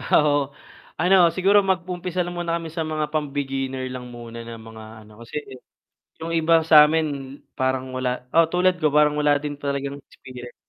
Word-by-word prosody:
Ah, 150 - +3
oo, 145 -1 +3 0.6
ano 180 +3 +4 0.2
siguro 195 +3 +4
mag-umpisa 180 -2 -2
lang 175 - -6
muna 170 -1 -1
kami 165 -1 -5
sa 165 - -4
mga 155 -1 -3
pam-beginner 135 -3 -3
lang 125 -1 -7
muna 115 -1 -9
na 115 0 -8
mga 110 0 -12 0.2
ano, 105 +1 -17
kasi 115 +5 -10 0.8
yung 165 +1 -3
iba 165 0 +4
sa 155 -2 +9
'min 145 -3 -2 0.2
parang 130 0 -1
wala 125 -1 -3
oo 165 0 +6
tulad 180 +1 +2
ko, 155 -3 +1
parang 150 0 +3
wala 145 -1 +2
din 145 -1 -4
talagang 140 0 -3
experience. 125 -1 -12
150 Hz, 175 wpm, -23 LUFS, 130-165 Hz, 0.8 s, sa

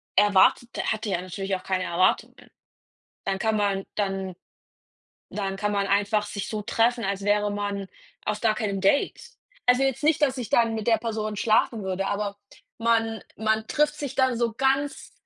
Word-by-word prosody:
erwartet 205 +4 +4
der - - -1
hat 220 +1 -3
er 185 -3 -1
natürlich 195 +2 -3
auch 185 - -7
keine 185 -1 -1
Erwartungen. 185 +2 0 0.7
Dann 195 -1 -1
kann 220 +2 +1
man 200 -2 0
dann 195 -2 -2 1.0
dann 195 -2 -3
kann 210 +1 -1
man 200 -1 +1
einfach 205 +1 +2
sich 205 -1 -5
so 215 -1 -3
treffen, 230 +2 +1
als 195 0 -2
wäre 205 +1 +2
man 205 -1 -3 0.4
auf 210 0 -2
gar 220 -2 +3
keinem 205 -3 -2
Date. 200 +9 +2 0.5
Also, 250 +1 +5
jetzt 270 0 0
nicht, 300 0 +2
dass 265 -2 +2
ich 240 -4 -4
dann 230 -1 +3
mit 220 -2 -4
der 230 -1 +5
Person 215 -2 -3
schlafen 215 +1 +2
würde, 190 0 -2
aber 205 0 -2 0.4
man 225 -1 +1 0.2
man 220 0 0
trifft 300 +4 +1
sich 285 -3 -5
dann 260 -3 +2
so 235 -1 +1
ganz 270 +3 0
210 Hz, 175 wpm, -25 LUFS, 195-230 Hz, 1.0 s, Also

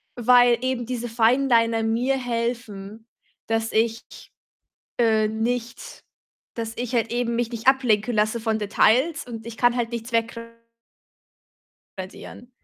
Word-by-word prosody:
weil 245 0 +5
eben 255 -2 -2
diese 240 0 -4
Fineliner 230 -1 +2
mir 235 +4 +1
helfen, 230 -3 -4 0.4
dass 225 0 -1
ich, 225 +1 +1 1.0
äh, 220 -2 +3
nicht 230 +2 -4 0.5
dass 225 -1 -4
ich 245 0 -4
halt 230 -1 0
eben 240 -1 -1
mich 235 -1 -1
nicht 235 +2 -3
ablenken 245 -4 +3
lasse 215 +2 +1
von 220 -1 -1
Details 250 +9 +2
und 225 -2 -8
ich 230 -1 -8
kann 245 0 +3
halt 235 -2 -1
nichts 235 +1 -5
wegra 230 0 -1 1.5
radieren. 190 +6 -9
230 Hz, 130 wpm, -23 LUFS, 225-245 Hz, 1.5 s, weil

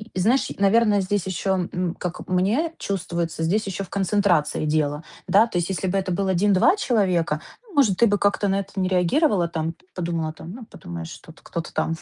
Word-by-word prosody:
и 185 - -1
знаешь, 240 +8 +2
наверно, 205 +1 +4
здесь 190 -1 -1
еще, 185 0 -1
м, 180 -1 -2
как 180 0 -5
мне 215 - +1
чувствуется, 170 -4 -3
здесь 195 +6 0
еще 195 0 -3
в 180 - -11
концентрации 190 -6 +1
дело, 150 0 0 0.2
да? 210 +4 +5
То 200 -7 -2
есть 175 - -2
если 190 0 -2
бы 195 +2 0
это 185 -1 -3
было 190 +1 0
1-2 195 - +4
человека, 185 - +1 0.3
может, 260 - +3
ты 235 - +5
бы 205 - +2
как-то 200 0 +1
на 195 +1 +1
это 195 0 -7
не 185 - +1
реагировала 185 - +2
там, 165 0 -3 0.2
подумала, 165 -3 -2
там, 165 - -10
ну 230 +3 -9
подумаешь, 85 - -8
что 160 - -12
кто-то 170 0 -6
там 165 - 0
185 Hz, 195 wpm, -23 LUFS, 170-205 Hz, 0.3 s, да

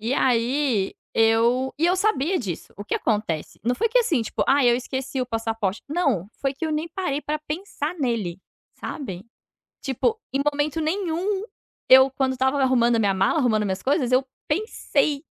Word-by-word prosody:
E 230 +5 -1
aí, 245 -3 +1 0.2
eu 230 +4 +3
e 330 - +1
eu 360 - +3
sabia 370 -3 +1
disso. 185 -9 -6
O 205 - -7
que - - -2
acontece? 205 -9 -2
Não 245 +2 +2
foi 455 - +1
que - - +3
assim, 335 - +2
tipo, 225 - -2
ai 270 -3 +4
eu 240 - +3
esqueci 260 +1 -4
o 250 - -1
passaporte, 225 -4 -2
não. 280 - 0
Foi 275 -1 0
que 325 - -5
eu 315 - -1
nem 310 +2 -2
parei 330 -5 -2
para 300 0 -3
pensar 310 0 -4
nele, 220 - -2 0.3
sabe? 195 - -6 0.6
Tipo, 435 - 0
em 275 - 0
momento 290 +2 -1
nenhum, 370 +4 -1 0.5
eu 265 +1 +8
quando 265 0 0
estava 265 +2 +1
arrumando 240 -2 +3
a - - +1
minha 200 -3 +2
mala, 195 +11 +2
arrumando 220 -6 +2
minhas 190 -2 -2
coisas 270 -3 +1
eu 255 +1 +4 0.2
pensei 300 - 0
265 Hz, 180 wpm, -24 LUFS, 225-305 Hz, 0.6 s, eu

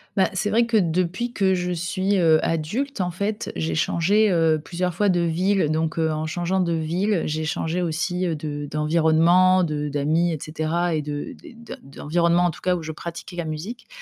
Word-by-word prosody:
Bah, 190 - +3
c'est 210 +2 -1
vrai 230 +1 +3
que, 230 - +2
depuis 185 +6 0
que 190 -3 +2
je 180 0 -2
suis, 185 +3 -1
heu, 160 -2 +5
adulte 200 - -2
en 180 - 0
fait, 200 +4 -3
j'ai 80 0 -2
changé, 200 - +2
heu, 160 -2 +2
plusieurs 180 +1 -2
fois 205 +4 +1
de 175 -1 +2
ville, 170 0 +1
donc, 160 +1 -1
heu, 160 -1 +1
en 155 0 -2
changeant 175 +3 -1
de 175 -2 +1
ville, 170 +4 0
j'ai 155 +1 -2
changé 165 +3 -2
aussi, 180 +2 -1
heu, 165 - -1
de 145 -1 -5
d'environnement, 165 +4 +3
de 150 -2 -2
d'amis 155 +4 +1
et 160 - -2
cetera 160 +3 -1
et 155 - 0
de 145 0 -5 0.3
de - - -8
d'environnement, 170 +5 0
en 175 - +2
tout - - -13
cas 180 -1 +1
où 170 - -5
je 160 - -5
pratiquais 170 +3 -8
la 170 - -2
musique 165 +11 -6
170 Hz, 200 wpm, -23 LUFS, 155-185 Hz, 0.3 s, heu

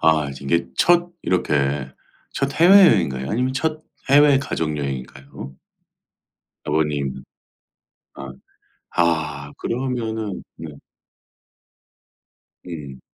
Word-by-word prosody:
아 80 -3 +3
이제 70 +1 -10
이게 85 0 +1
첫 175 0 +3
이렇게 70 -6 0 0.4
첫 140 +1 -2
해외여행인가요 160 - +5
아니면 125 +4 0
첫 155 +3 -2 0.3
해외 145 -1 +6
가족여행인가요? 70 - -5 1.1
아버님 75 -3 -1 0.9
아 70 -1 -8 0.7
아 75 -4 0
그러면은 115 -5 -3
네. 80 - -8 2.0
음. 70 -6 -8
80 Hz, 185 characters per minute, -21 LUFS, -, 2.0 s, 해외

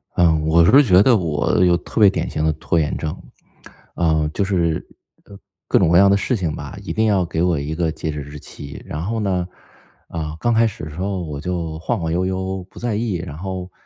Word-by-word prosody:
嗯， 80 -3 +3
我 85 +1 +5
是 140 +11 +7
觉 95 -6 +5
得 130 - +5
我 80 -1 +1
有 90 -1 +4
特 90 - -4
别 100 - +8
典 - - -2
型 75 - -2
的 80 - +3
拖 80 +2 -1
延 75 -2 0
症。 75 - -3 0.8
呃， 80 -2 +1
就 100 - 0
是 85 -5 0 0.8
各 - - +3
种 90 - +3
各 85 - +5
样 100 +2 +7
的 100 - +4
事 125 +5 0
情 85 -8 -2
吧， - - -8
一 - - -5
定 110 - +1
要 100 -4 +3
给 85 -1 -2
我 85 -4 +1
一 75 +3 -4
个 80 -1 0
截 80 0 -4
止 75 -1 -5
日 70 +1 -9
期。 70 0 -10
然 75 - -5
后 110 +5 -2
呢， 95 -4 -1 0.6
啊， 80 -2 -5
刚 120 - +1
开 115 +1 +4
始 100 - -7
的 - - -7
时 75 - -11
候 95 0 -2
我 75 -3 -6
就 85 -1 -3
晃 115 +6 -2
晃 80 -2 -2
悠 90 +2 0
悠 95 0 -3
不 - - -13
在 120 -3 -2
意， 110 -2 -1
然 85 -4 -6
后， 90 0 -5
90 Hz, 250 characters per minute, -20 LUFS, 80-95 Hz, 0.8 s, 别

